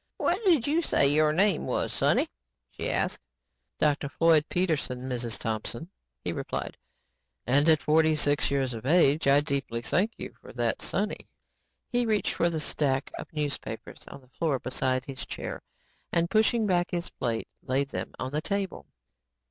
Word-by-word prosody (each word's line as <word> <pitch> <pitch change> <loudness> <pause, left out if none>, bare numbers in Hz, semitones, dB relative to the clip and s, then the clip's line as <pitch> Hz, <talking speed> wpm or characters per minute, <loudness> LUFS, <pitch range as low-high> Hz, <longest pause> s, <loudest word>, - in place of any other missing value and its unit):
"What 375 +6 0
did 325 -11 +4
you 310 +4 +2
say 140 - +3
your 150 +2 +4
name 185 +1 +2
was, - - -1
sonny?" - - +2 0.4
she - - -4
asked. - - 0 0.6
"Dr. 145 -2 +1
Floyd 165 0 +4
Peterson, 155 -8 0
Mrs. 120 -4 -2
Thompson," 115 - -3 0.3
he - - -1
replied, - - -4 0.7
"and 145 +6 +3
at 155 -2 +4
forty 155 +1 +4
six 145 -1 +2
years 135 -2 0
of 115 +2 -6
age, 155 -2 +4
I 140 +1 +6
deeply 140 -5 -2
thank 205 - +1
you - - -7
for - - -12
that 120 -2 -1
'sonny'." 205 +3 -2 0.6
He 245 -1 0
reached 215 -2 +1
for 170 - +2
the 160 -2 -2
stack 140 -3 0
of - - -8
newspapers 150 -2 -4
on 140 - -10
the 130 - -23
floor 150 0 0
beside 130 +1 -1
his 135 -2 -6
chair - - -6 0.5
and 170 0 +1
pushing 220 +1 +3
back 175 -3 +2
his 175 -1 -3
plate, 115 -3 -2
laid 135 +2 0
them - - -5
on 130 0 -4
the 150 +1 -1
table. 200 +1 -3
150 Hz, 165 wpm, -28 LUFS, 130-175 Hz, 0.7 s, I